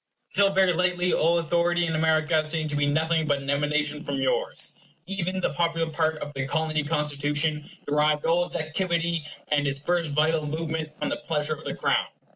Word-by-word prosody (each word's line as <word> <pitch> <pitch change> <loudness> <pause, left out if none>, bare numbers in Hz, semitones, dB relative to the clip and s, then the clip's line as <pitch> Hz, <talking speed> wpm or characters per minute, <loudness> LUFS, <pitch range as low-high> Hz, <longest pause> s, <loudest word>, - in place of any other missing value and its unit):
Until 200 -1 +4
very 190 -2 +4
lately 180 +1 +1
all 170 +2 +3
authority 170 +1 +1
in 165 - -2
America 155 0 +2
seemed 155 0 -2
to - - -1
be 145 0 +2
nothing 160 +2 +1
but 145 -1 +2
an 140 0 -3
emanation 150 +1 0
from 140 - -3
yours. 135 -1 0 0.3
Even, 190 0 -2
the - - 0
popular 165 -1 0
part 160 0 0
of 145 - -8
the 135 -1 -3
Colony 155 0 0
Constitution 150 0 -1 0.2
derived 150 0 +2
all 170 +1 +3
its - - -5
activity 170 0 0 0.3
and 145 -1 +2
its 140 0 -1
first 170 0 0
vital 155 0 +2
movement 160 0 -3
from - - -2
the - - -2
pleasure 155 -1 -1
of 150 - -10
the - - -3
Crown. - - +1
155 Hz, 190 wpm, -26 LUFS, 150-170 Hz, 0.3 s, Until